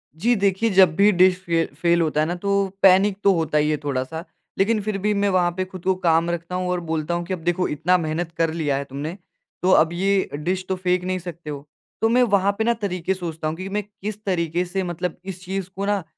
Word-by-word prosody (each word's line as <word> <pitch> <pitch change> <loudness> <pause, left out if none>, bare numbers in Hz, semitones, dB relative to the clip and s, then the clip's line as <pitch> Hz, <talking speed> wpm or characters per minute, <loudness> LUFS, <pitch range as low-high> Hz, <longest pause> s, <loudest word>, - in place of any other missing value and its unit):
जी, 235 +9 +2
देखिए 200 +2 +1
जब 185 -5 +5
भी 205 +3 +5
डिश 185 0 +4
फे 165 -1 +1 0.2
फेल 170 0 +3
होता 155 -1 +1
है - - +2
ना 175 - -2
तो 200 +1 0
पैनिक 195 +1 +5
तो 200 -1 +5
होता 160 -3 0
ही 150 0 +2
है 150 - 0
थोड़ा-सा 145 +4 -3 0.3
लेकिन 215 +2 +2
फिर 210 0 -2
भी 210 +2 0
मैं 200 0 +1
वहाँ 180 -2 +2
पे 185 - 0
खुद 185 -1 -11
को 190 0 +3
काम 170 -2 +2
रखता 170 +1 -4
हूँ 180 0 -2
और 180 - 0
बोलता 160 +1 -1
हूँ 175 0 -2
कि 185 - -3
अब 180 - -4
देखो 175 +1 +1
इतना 170 +5 +2
मेहनत 165 0 -3
कर 165 -1 +1
लिया 145 -4 0
है 140 - -2
तुमने। 145 +7 -6 0.4
तो 185 +1 +3
अब 160 -2 +5
ये 195 +2 +1
डिश 180 +5 -2
तो 190 - +1
फेंक 180 -1 0
नहीं 185 0 -2
सकते 170 -3 -8
हो, 145 0 -7 0.3
तो 225 - +3
मैं 250 +2 +4
वहाँ 200 -3 +3
पे 220 - +1
ना 235 +1 +3
तरीक़े 190 -4 -2
सोचता 165 -4 -5
हूँ 155 - -2
कि 185 +2 -6
मैं 205 +1 -2
किस 210 +1 -8
तरीक़े 175 -2 0
से 190 +2 -2
मतलब 175 -1 -4
इस 185 -1 -7
चीज़ 190 0 -4
को 195 +1 -3
ना 205 -2 0
180 Hz, 250 wpm, -22 LUFS, 165-195 Hz, 0.4 s, जब